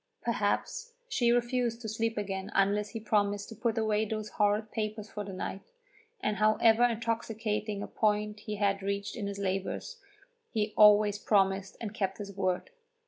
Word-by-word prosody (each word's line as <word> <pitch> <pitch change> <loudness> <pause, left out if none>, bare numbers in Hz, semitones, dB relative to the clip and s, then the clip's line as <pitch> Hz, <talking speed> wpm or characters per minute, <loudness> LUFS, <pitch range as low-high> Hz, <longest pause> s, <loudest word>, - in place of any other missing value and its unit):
Perhaps 480 -1 -1
she 240 - +2
refused 240 -1 +1
to 225 - -5
sleep 225 +1 -1
again 195 -2 -3
unless 205 +1 +2
he 225 - -5
promised 205 -2 0
to 225 - -8
put 225 +1 -1
away 215 -1 +2
those 215 0 -3
horrid 210 +1 +1
papers 215 -1 -3
for 210 - -4
the 200 - -7
night, 190 +1 -5 0.5
and 210 -1 0
however 220 +2 +4
intoxicating 225 -3 -1
a - - -5
point 210 -1 0
he 210 0 -5
had 200 -1 +1
reached 200 +1 -2
in 210 -4 -3
his 200 0 -4
labours, 195 - -3 0.5
he 215 -2 -1
always 210 -1 +6
promised, 195 -2 +1
and 220 -2 -5
kept 195 -3 -2
his 200 -1 -7
word. 185 -2 -1
210 Hz, 165 wpm, -30 LUFS, 200-225 Hz, 0.5 s, always